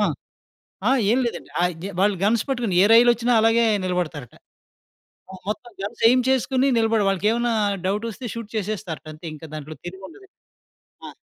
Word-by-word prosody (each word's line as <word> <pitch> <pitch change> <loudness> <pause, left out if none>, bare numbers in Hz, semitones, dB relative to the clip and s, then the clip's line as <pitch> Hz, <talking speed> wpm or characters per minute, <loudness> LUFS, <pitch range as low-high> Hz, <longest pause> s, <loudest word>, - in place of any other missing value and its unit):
ఆ! - - +2 0.9
ఆ! - - +4 0.2
ఏం 245 - +3
లేదండి. 235 - -5
ఆహ్, 180 0 +1 0.3
వాళ్ళు 200 +1 +3
గన్స్ 220 +2 +2
పట్టుకొని 240 -8 -1
ఏ - - +6
రైలొచ్చినా 240 +1 +5
అలాగే 225 +1 +4 0.2
నిలబడతారట. 170 -8 -3 1.1
మొత్తం 240 +3 -5
గన్స్ 210 +4 -6
ఎయిమ్ 255 +1 +3
చేసుకొని 265 +1 +2
నిలబడ 225 -1 +2
వాళ్ళకేమన్నా 225 +5 +1 0.3
డౌట్ 205 +4 -1
వస్తే 235 +4 -8
షూట్ 230 -2 -7
చేసేస్తారట. 195 -8 -4
అంతే 155 +2 -13
ఇంకా 155 +1 -10
దాంట్లో 155 +1 -7
తిరుగుండదు. 190 - -10 0.8
ఆ! - - -7
215 Hz, 145 wpm, -23 LUFS, 185-235 Hz, 1.1 s, ఏ